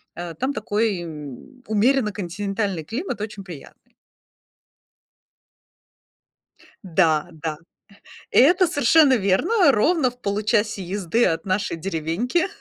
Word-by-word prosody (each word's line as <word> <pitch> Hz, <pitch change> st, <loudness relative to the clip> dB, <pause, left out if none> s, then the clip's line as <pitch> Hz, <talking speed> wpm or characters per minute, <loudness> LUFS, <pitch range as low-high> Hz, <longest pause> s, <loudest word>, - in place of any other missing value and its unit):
э, 175 Hz, -1 st, -6 dB
там 265 Hz, -, -2 dB
такой, 210 Hz, -5 st, -1 dB
м, 155 Hz, -, -10 dB
умеренно-континентальный 205 Hz, -, -1 dB
климат 245 Hz, -, -4 dB
очень 210 Hz, -2 st, -6 dB
приятный. 170 Hz, -7 st, -13 dB, 2.9 s
Да 165 Hz, -4 st, +2 dB
да, 155 Hz, -1 st, -5 dB, 0.7 s
и -, -, +5 dB
это 355 Hz, +8 st, +5 dB
совершенно 290 Hz, -2 st, +4 dB
верно: 275 Hz, -, +3 dB
ровно 270 Hz, +4 st, +2 dB
в 245 Hz, -, -18 dB
получасе 210 Hz, -1 st, 0 dB
езды 195 Hz, +5 st, 0 dB
от 165 Hz, 0 st, -1 dB
нашей 185 Hz, -2 st, -1 dB
деревеньки 190 Hz, -, -1 dB
205 Hz, 100 wpm, -22 LUFS, 175-250 Hz, 2.9 s, и